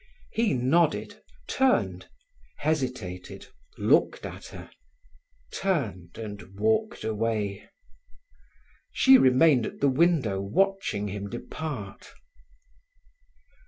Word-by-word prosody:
He 225 - +1
nodded, 150 +6 +1 0.2
turned, 265 -1 +1 0.5
hesitated, 125 - -3 0.3
looked - - +2
at - - -8
her, - - -11 0.8
turned 110 - -2
and 100 -3 -8
walked 220 0 0
away. 110 -2 -2 1.2
She 265 -1 +6
remained 130 -1 +4
at - - -9
the 140 - +3
window 135 - +2
watching 185 - 0
him 100 +1 -5
depart. 120 -3 -7
125 Hz, 85 wpm, -27 LUFS, 100-170 Hz, 1.2 s, She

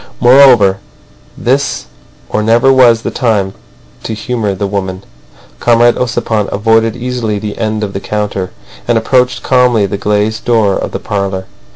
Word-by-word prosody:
Moreover, 120 -7 +5 0.6
this 135 - -1 0.4
or 105 - -1
never 120 +5 +3
was 120 -3 +4
the - - -3
time 105 -6 0 0.5
to 110 - -5
humour 110 -2 -3
the 100 - -3
woman. 95 -1 -4 0.6
Comrade 120 0 +3
Ossipon 115 -4 -1
avoided 115 +2 +1
easily 120 -4 -3
the 105 0 -6
end 110 -1 -2
of 100 -2 -4
the 95 - -3
counter, 100 -2 -3 0.4
and 120 -1 +2
approached 125 +2 +1
calmly 125 -5 +2
the 100 +1 -4
glazed 105 +2 -1
door 110 -5 +2
of - - -3
the - - -4
parlour. 100 -2 -3
110 Hz, 150 wpm, -12 LUFS, 100-120 Hz, 0.6 s, Moreover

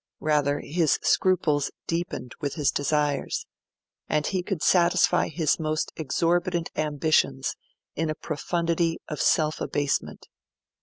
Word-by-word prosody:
Rather, 145 -2 +1
his 160 -1 +1
scruples 155 -6 +2 0.2
deepened 165 -7 -3
with 145 -2 -2
his 150 -3 +2
desires; 145 0 0 0.6
and 150 -1 +1
he 190 -2 0
could 180 -3 -3
satisfy 175 -1 +4
his 160 0 0
most 155 0 -1
exorbitant 170 +3 0
ambitions 150 - +1 0.4
in 160 +1 -1
a 155 - -2
profundity 165 +2 -1
of 150 - -4
self 155 -1 +2
abasement. 145 -1 -2
155 Hz, 115 wpm, -26 LUFS, 145-170 Hz, 0.6 s, satisfy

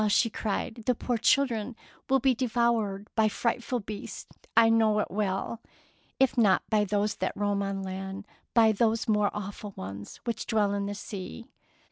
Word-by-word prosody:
Ah," 210 - +2 0.2
cried 220 +2 -2
she, - - -8
" - - -18
the 250 - +3
poor 245 +2 -1
children 245 -2 +2 0.3
will 270 - +5
be 260 0 +3
devoured 230 -4 0
by 220 -1 +3
frightful 240 +3 -1
beasts, 210 -1 -8 0.2
I 230 0 +8
know 225 -2 +4
it 210 - -1
well, 205 +3 -2 0.3
— - - -36
if 265 -2 +3
not 205 -5 +4
by 210 -1 +3
those 205 +1 0
that 185 - -2
roam 205 -1 0
on 195 -1 -2
land, 190 +1 -5 0.3
by 225 -2 +6
those 220 +1 +1
more 210 -2 +3
awful 205 0 -6
ones 100 +2 -7
which 235 -2 -3
dwell 210 -2 +2
in 200 0 -1
the 205 - -4
sea 190 - -7
210 Hz, 180 wpm, -28 LUFS, 200-230 Hz, 0.3 s, I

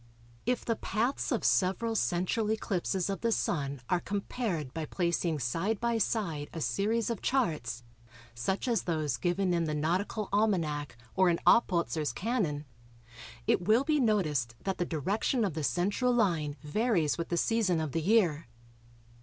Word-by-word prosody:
If 250 0 0
the 230 - +1
paths 240 +8 -1
of 235 - 0
several 200 +5 +2
central 185 +3 0
eclipses 190 -4 -1
of 195 -1 -3
the 230 - +1
Sun 140 - -1
are 180 - +2
compared 195 - -3
by 160 -1 -3
placing 170 -1 0
side 165 - -1
by 235 -1 0
side 170 -10 -1
a 165 - -4
series 220 +8 0
of 230 - -4
charts, 150 - 0 0.5
such 155 - -2
as 235 -5 +2
those 155 -7 -1
given 180 +5 0
in 170 -1 +1
the 155 -1 -2
Nautical 185 +7 -1
Almanac 155 - 0 0.2
or 185 -1 +4
in 170 - +2
Oppolzer's 170 - +3
Canon, 170 - -1 0.8
it - - +2
will 225 +5 +5
be 300 +1 +2
noticed 155 - +1
that 195 -1 -2
the 175 - +1
direction 200 - 0
of 190 - -2
the 155 0 -3
central 200 - +1
line 170 -11 +1
varies 170 - +1
with 170 - -3
the 170 - 0
season 205 -5 +2
of 155 -3 -2
the 165 - -1
year. 170 - +2
180 Hz, 160 wpm, -30 LUFS, 155-220 Hz, 0.8 s, will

